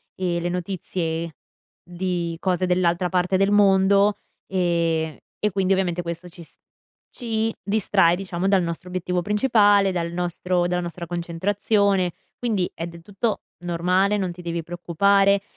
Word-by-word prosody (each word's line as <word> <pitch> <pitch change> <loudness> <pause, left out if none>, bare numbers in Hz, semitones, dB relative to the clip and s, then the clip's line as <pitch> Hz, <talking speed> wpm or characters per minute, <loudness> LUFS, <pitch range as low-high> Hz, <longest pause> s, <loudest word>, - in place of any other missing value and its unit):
ehm, 175 -2 -1
le 175 - -1
notizie 170 -2 -3 0.6
di 175 -2 -2
cose 185 -1 0
dell'altra 180 0 +1
parte 180 +1 +1
del 195 +1 +3
mondo, 200 0 +4 0.3
ehm, 170 -4 0 0.2
e 210 -1 0
quindi 195 0 +1
ovviamente 175 -2 0
questo 170 +1 -6
ci 170 0 -12
s - - -19 0.6
ci 225 -2 -2
distrae, 195 -4 +3
diciamo, 185 -1 -3
dal 195 -2 +4
nostro 170 +1 -5
obiettivo 180 -1 -2
principale, 205 -2 +4
dal 170 -2 -2
nostro 175 0 -1
dalla 180 0 0
nostra 170 0 -6
concentrazione. 185 +2 0 0.3
Quindi 210 -7 -1
è 165 - -4
del 170 -1 -10
tutto 205 +4 -2 0.2
normale, 180 +4 +1
non 185 -3 -1
ti 175 0 -11
devi 170 0 -3
preoccupare, 195 +4 +2
180 Hz, 145 wpm, -23 LUFS, 170-195 Hz, 0.6 s, mondo